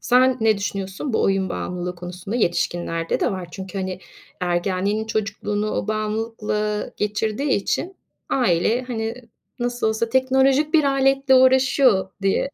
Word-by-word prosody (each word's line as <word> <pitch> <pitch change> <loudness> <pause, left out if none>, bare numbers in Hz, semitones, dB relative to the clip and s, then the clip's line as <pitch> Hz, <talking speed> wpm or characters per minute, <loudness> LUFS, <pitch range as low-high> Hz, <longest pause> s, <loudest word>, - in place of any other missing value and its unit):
Sen 255 +1 +4
ne 220 -2 +3
düşünüyorsun 200 +5 -4
bu - - +1
oyun 195 -1 +1
bağımlılığı 180 0 -4
konusunda? 180 +4 -6
Yetişkinlerde 175 -4 -1
de - - +2
var. 180 -2 -5
Çünkü, 190 +1 -7
hani, 185 -1 -3 0.4
ergenliğini, 185 +4 0
çocukluğunu 210 0 -2
o 195 - -3
bağımlılıkla 215 -1 -2
geçirdiği 215 +6 -1
için 350 - -1 0.3
aile, 235 +1 +2
hani, 225 -2 -3 0.4
"Nasıl 245 -1 -1
olsa 220 +1 -1
teknolojik 265 +4 +2
bir 310 -2 +5
aletle 270 0 +3
uğraşıyor." 255 -6 +4
diye 195 +7 +1
215 Hz, 130 wpm, -22 LUFS, 190-255 Hz, 0.4 s, bir